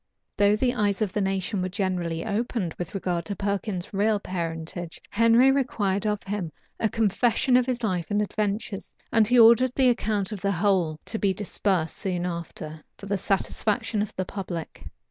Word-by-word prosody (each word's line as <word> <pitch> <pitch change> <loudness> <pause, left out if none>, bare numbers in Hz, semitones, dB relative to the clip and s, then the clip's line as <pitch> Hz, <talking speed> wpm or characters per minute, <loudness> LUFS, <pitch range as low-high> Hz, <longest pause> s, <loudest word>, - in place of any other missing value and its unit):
Though 205 0 +4
the 245 +3 +1
eyes 205 -3 +1
of 200 -3 -3
the 210 - 0
nation 195 +1 -1
were 185 - -1
generally 180 -4 -2
opened 215 -4 -2
with 175 +2 -5
regard 180 -3 -1
to 200 - -4
Perkin's 200 -1 -3
real 205 +1 +2
parentage, 170 -2 -5
Henry 230 +4 +5
required 215 -7 0
of 210 -1 -1
him 195 -5 -3 0.3
a 220 - +1
confession 225 +5 +2
of 250 0 +4
his 245 -2 -2
life 180 -6 -1
and 205 - +1
adventures; 210 0 -2 0.2
and 225 -2 +4
he 250 +2 +4
ordered 235 +2 +7
the 260 -2 +4
account 215 -4 0
of 205 -3 -5
the 200 +1 +1
whole 180 -4 +1
to 220 - -1
be 195 -2 +1
dispersed 190 -4 -1
soon 180 -3 -2
after, 160 -3 -6
for - - -10
the 200 0 -1
satisfaction 205 +2 0
of 210 - -2
the 185 - -2
public. 180 -4 -6
200 Hz, 180 wpm, -26 LUFS, 180-220 Hz, 0.3 s, ordered